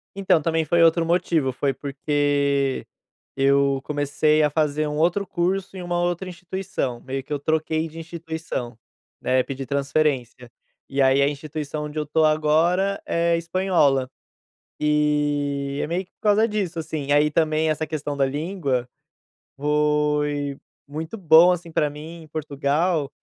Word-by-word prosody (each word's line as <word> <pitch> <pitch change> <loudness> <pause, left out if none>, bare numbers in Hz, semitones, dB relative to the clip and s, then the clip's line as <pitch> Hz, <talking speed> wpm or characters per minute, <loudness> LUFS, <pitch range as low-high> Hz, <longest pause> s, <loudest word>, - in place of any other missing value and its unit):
Então, 190 -5 +2
também 160 0 0
foi 170 +2 +3
outro 165 0 +4
motivo, 165 -6 +1
foi 135 +1 0
porque 140 -1 0 0.5
eu 140 0 +3
comecei 150 +1 +1
a 150 - +3
fazer 150 0 0
um 150 0 -3
outro 175 +5 +1
curso, 190 +2 -2
em 185 - -6
uma 175 0 -1
outra 175 +1 -1
instituição, 180 -8 -4
meio 135 0 -4
que 150 - -19
eu 145 - -1
troquei 160 +2 0
de 160 +1 -13
instituição, 160 -7 -6 0.4
né, 130 0 +2
pedi 135 0 -6
transferência, 135 -3 -1 0.4
e 140 0 0
aí 135 +1 +4
a 140 - +4
instituição 150 +1 -5
onde 150 +1 -7
eu - - 0
estou 155 +2 +2
agora 160 +6 +2
é 170 0 +1
espanhola. 165 -7 +1 0.7
E 145 -2 0
é - - -2
meio 175 +4 -1
que - - -42
por - - -76
causa 210 +1 +4
disso, 195 -6 -2
assim, 155 -3 -4
aí 150 +1 +4
também 155 0 +1
essa 155 0 -1
questão 150 -2 -4
da 135 - +3
língua, 145 -3 -2 0.7
foi 150 -1 0 0.3
muito 160 +8 -6
bom, 170 -1 +7
assim, 170 -1 -6
pra 150 -2 +1
mim, 160 +2 -10
Portugal, 150 +1 0
150 Hz, 150 wpm, -23 LUFS, 140-165 Hz, 0.7 s, bom